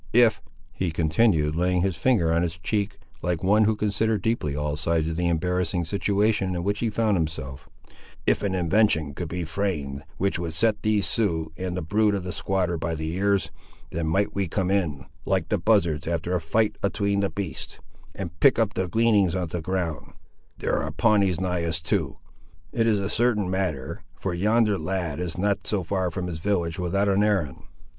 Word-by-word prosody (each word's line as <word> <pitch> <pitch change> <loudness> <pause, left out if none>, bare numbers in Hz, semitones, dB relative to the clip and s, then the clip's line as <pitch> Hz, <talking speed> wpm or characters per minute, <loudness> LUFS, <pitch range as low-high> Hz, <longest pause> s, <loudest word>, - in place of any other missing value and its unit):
If," 115 -3 +5 0.3
he 95 - -2
continued, 80 -1 +2
laying 90 +1 +1
his 95 -3 0
finger 85 -4 +2
on 85 - +2
his 85 -2 -2
cheek, 100 +4 -2 0.2
like 90 -1 -1
one 105 +3 +4
who 110 +1 +2
considered 105 0 0
deeply 110 -11 0
all 75 0 -1
sides 80 +1 0
of 80 - -2
the 90 +1 0
embarrassing 90 +1 0
situation 100 +1 +1
in 85 - -2
which 100 +2 -1
he 115 - 0
found 110 -2 +1
himself,—"if 75 -5 -4
an 100 -2 -1
invention 85 -4 +2
could 85 +3 -4
be 90 +2 -3
framed, 80 -6 -2 0.2
which 95 -3 0
would 85 -2 -4
set 105 +4 +2
these 105 -2 +2
Siouxes 80 -8 +1
and 90 0 -4
the 90 - -2
brood 105 +5 +2
of 95 - -3
the 90 - -4
squatter 90 -4 -1
by 85 +1 -2
the 80 +1 -3
ears, 100 -4 +1 0.4
then 80 -1 -2
might 95 +6 +1
we 100 -2 -1
come 95 +2 -1
in, 80 -8 0 0.2
like 95 -4 0
the 105 - +1
buzzards 85 -7 +2
after 85 +1 -1
a 90 - +1
fight 110 +7 0
atween 100 0 0
the 100 -1 +1
beasts, 100 -5 -5 0.4
and 85 -4 -6
pick 140 - +5
up 110 -3 +1
the 95 -1 -1
gleanings 105 -2 +3
of 90 -4 -2
the 85 - -2
ground—there 85 -3 -4
are - - -3
Pawnees 100 -6 +2
nigh 90 -2 -1
us, 80 -1 -1
too! 80 - -1 0.5
It 115 -1 +1
is 110 -2 +3
a 100 -1 -1
certain 105 -4 +1
matter, 90 -9 -2 0.2
for 95 - -2
yonder 105 +3 +2
lad 90 -5 -2
is 90 -2 -3
not 100 +1 0
so 100 -3 0
far 95 +1 -1
from 90 +1 -4
his 85 -3 -4
village 85 -3 -1
without 100 +3 +1
an 100 0 +3
errand. 95 -10 0
90 Hz, 190 wpm, -25 LUFS, 80-100 Hz, 0.5 s, If